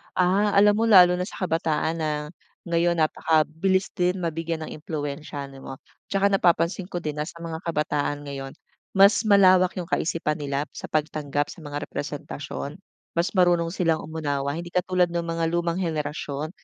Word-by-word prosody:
Ah. 195 +3 +2
Alam 205 +1 +6
mo - - +2
lalo 180 -4 +7
na 180 - -1
sa - - -10
kabataan 160 -1 0
na 155 -1 0 0.6
ngayon 170 0 +1
napakabilis 160 +4 +1
din 180 +1 +1
mabigyan 165 -1 -3
ng - - -7
impluwensiya, 145 -2 -5
di 135 - -12
ba. 135 - -8 0.4
Tsaka 200 0 +2
napapansin 175 -1 +2
ko 175 - -4
din 150 -3 -4
na 150 - -1
sa 170 - -10
mga 160 -1 -5
kabataan 150 -2 -1
ngayon 135 -1 -6 0.4
mas 200 +2 +6
malawak 185 -3 +5
yung 180 - -3
kaisipan 165 -3 -1
nila 140 0 -2
sa - - -8
pagtanggap, 150 -1 -1
sa - - -14
mga 145 -1 -5
representasyon. 145 +2 -6 0.3
Mas 170 +2 +1
marunong 175 -2 +3
silang 165 -2 0
umunawa 145 -3 -2
hindi 175 +1 -6
katulad 180 -1 +2
nung 170 0 -2
mga 165 0 0
lumang 170 0 0
henerasyon, 150 -3 -3
165 Hz, 160 wpm, -25 LUFS, 150-180 Hz, 0.6 s, lalo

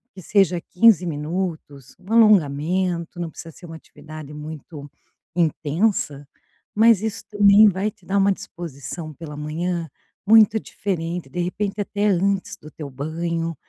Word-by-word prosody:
que 185 - -10
seja 190 -4 +2
15 185 0 +4
minutos, 155 -4 -5
um 190 +3 -12
alongamento, 175 -3 +2
não 170 -2 -3
precisa 165 +1 -10
ser 175 - -13
uma 165 - -9
atividade 155 -2 -11
muito 150 -1 -9 0.5
intensa, 155 -2 0 0.5
mas 220 -1 +5
isso 220 - -3
também 205 0 +6
vai 195 +3 -2
te 185 - -27
dar 200 +1 0
uma 195 0 +4
disposição 160 -3 -7
pela 150 -1 -9
manhã, 165 +3 -3 0.4
muito 220 0 +6
diferente. 170 -8 -4
De 175 - -6
repente, 200 +3 -3
até 205 +1 -1
antes 195 0 0
do 150 0 -14
teu 150 -3 -8
banho, 165 +4 -3
175 Hz, 140 wpm, -22 LUFS, 155-200 Hz, 0.5 s, também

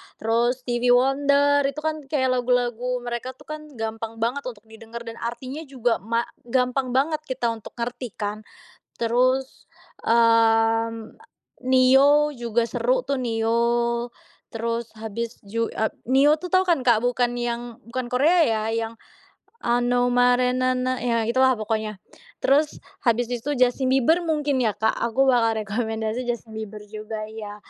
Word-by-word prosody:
Terus, 235 +3 0
Stevie 245 0 +2
Wonder 280 +2 +3
itu 280 +2 -4
kan 315 0 -1
kayak 260 -3 +1
lagu-lagu 245 0 0
mereka 240 +1 -5
tuh - - -17
kan 305 0 -8
gampang 225 0 -5
banget 245 +5 0
untuk 220 -5 -8
didengar 225 +1 -10
dan 230 -1 -8
artinya 255 +6 -5
juga 245 -4 0
ma 230 +3 -1 0.2
gampang 250 +1 0
banget 300 +4 +2
kita 245 -2 -1
untuk 225 -2 -9
ngerti 240 -1 -5
kan. 210 0 -3 0.6
Terus, 255 +3 +1 0.4
mmm, 225 -1 +3
a - - -22 0.3
Ne-Yo 270 +3 +5
juga 235 -1 0
seru - - +1
tuh, 280 - +1
Ne-Yo, 235 +1 0 0.4
terus 230 0 -3
habis 225 +2 -4
ju 230 +3 -2
eee, 220 - 0 0.2
Ne-Yo 280 +3 +5
tuh 360 +2 -8
tau 370 0 +3
kan, 340 -4 +3
Kak? 235 -3 +4
Bukan 245 0 +1
yang 240 0 -4
bukan 240 +1 -4
Korea 300 +8 +4
ya, 220 -6 +1
yang 225 0 -2 0.7
ano 245 +1 +2
marinana 255 +1 +2
ya 230 -2 +1
itulah 260 +2 +3
pokoknya. 215 -1 -3 0.4
Terus 290 +3 +2 0.2
habis 240 -1 +2
itu 245 +4 -3
Justin 255 +1 +2
Bieber 270 +6 +3
mungkin 295 -5 0
ya, 225 - +2
Kak, 220 - +2
aku 235 +4 +2
bakal 230 -4 +2
rekomendasi 220 +2 -3
Justin 235 -2 -4
Bieber 215 -1 -6
juga 215 +1 -6
ya. 215 -1 -8
240 Hz, 145 wpm, -24 LUFS, 225-260 Hz, 0.7 s, Ne-Yo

